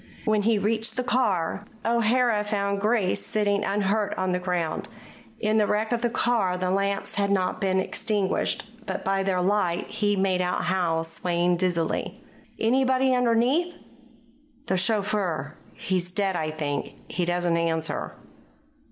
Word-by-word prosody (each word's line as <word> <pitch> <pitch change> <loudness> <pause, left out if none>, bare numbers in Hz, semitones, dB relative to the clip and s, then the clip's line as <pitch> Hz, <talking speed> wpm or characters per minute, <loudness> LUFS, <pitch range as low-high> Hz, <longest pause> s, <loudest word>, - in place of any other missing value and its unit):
When 215 -2 +2
he 220 +1 +2
reached 220 +3 0
the 255 - 0
car, 205 -8 0 0.2
O'Hara 235 -1 +2
found 200 -1 -1
Grace 210 -3 +1
sitting 205 -1 0
unhurt 205 +1 0
on 185 0 0
the 180 - 0
ground. 180 -3 -2 0.5
In 215 0 +2
the 210 - +3
wreck 215 +2 0
of 240 -1 0
the 240 - +1
car 225 -6 +1
the 185 0 -1
lamps 200 +1 0
had 200 0 +1
not 185 -2 0
been 190 -1 +2
extinguished, 205 +1 -1 0.2
and - - -3
by 195 0 +1
their 185 -2 0
light 185 -2 +1
he 205 -1 +1
made 190 -1 +1
out 180 0 -1
Howe, 170 -3 +1
swaying 175 +1 0
dizzily. 170 -2 -1 0.4
"Anybody 260 +2 +3
underneath?" 250 +8 +2 0.9
"The 190 - 0
chauffeur. 190 - 0 0.2
He's 180 -1 -2
dead, 195 -1 0
I 155 -2 -1
think. 150 -2 -3
He 180 - -2
doesn't 175 -1 +1
answer." 165 -1 -1
200 Hz, 145 wpm, -25 LUFS, 180-220 Hz, 0.9 s, the